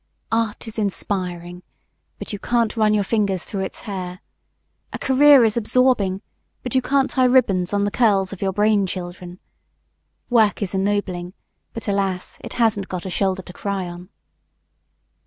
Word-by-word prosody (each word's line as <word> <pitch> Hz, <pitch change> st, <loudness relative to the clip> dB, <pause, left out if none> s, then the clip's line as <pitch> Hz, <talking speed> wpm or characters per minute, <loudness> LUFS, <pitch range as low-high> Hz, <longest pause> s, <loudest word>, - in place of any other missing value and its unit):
Art 225 Hz, 0 st, -1 dB
is 225 Hz, 0 st, -6 dB
inspiring, 180 Hz, -3 st, -3 dB, 0.6 s
but -, -, -7 dB
you 205 Hz, -, -4 dB
can't 235 Hz, 0 st, 0 dB
run 215 Hz, -2 st, +3 dB
your 205 Hz, -, +2 dB
fingers 195 Hz, -4 st, 0 dB
through 195 Hz, -, -4 dB
its 190 Hz, -, -5 dB
hair; 185 Hz, -4 st, -6 dB, 0.7 s
a -, -, -4 dB
career 275 Hz, 0 st, +6 dB
is 215 Hz, -, +1 dB
absorbing, 230 Hz, -5 st, +2 dB, 0.4 s
but 250 Hz, -, -4 dB
you 260 Hz, -, +3 dB
can't 275 Hz, +1 st, +2 dB
tie 260 Hz, -1 st, +3 dB
ribbons 200 Hz, -9 st, +3 dB
on 200 Hz, 0 st, +1 dB
the 205 Hz, -, 0 dB
curls 200 Hz, -5 st, +2 dB
of 195 Hz, -, -10 dB
your 195 Hz, -1 st, +1 dB
brain 205 Hz, 0 st, +2 dB
children; 180 Hz, -1 st, -7 dB, 0.9 s
work 220 Hz, -4 st, +3 dB
is 190 Hz, -, -3 dB
ennobling, 190 Hz, -2 st, -1 dB, 0.4 s
but, 230 Hz, -, -8 dB
alas, 195 Hz, -2 st, -2 dB
it -, -, -7 dB
hasn't 220 Hz, -5 st, +1 dB
got 180 Hz, -1 st, -5 dB
a 190 Hz, -, -4 dB
shoulder 190 Hz, 0 st, 0 dB
to 180 Hz, -, -11 dB
cry 195 Hz, -2 st, -3 dB
on! 175 Hz, +1 st, -9 dB
200 Hz, 160 wpm, -21 LUFS, 185-225 Hz, 0.9 s, career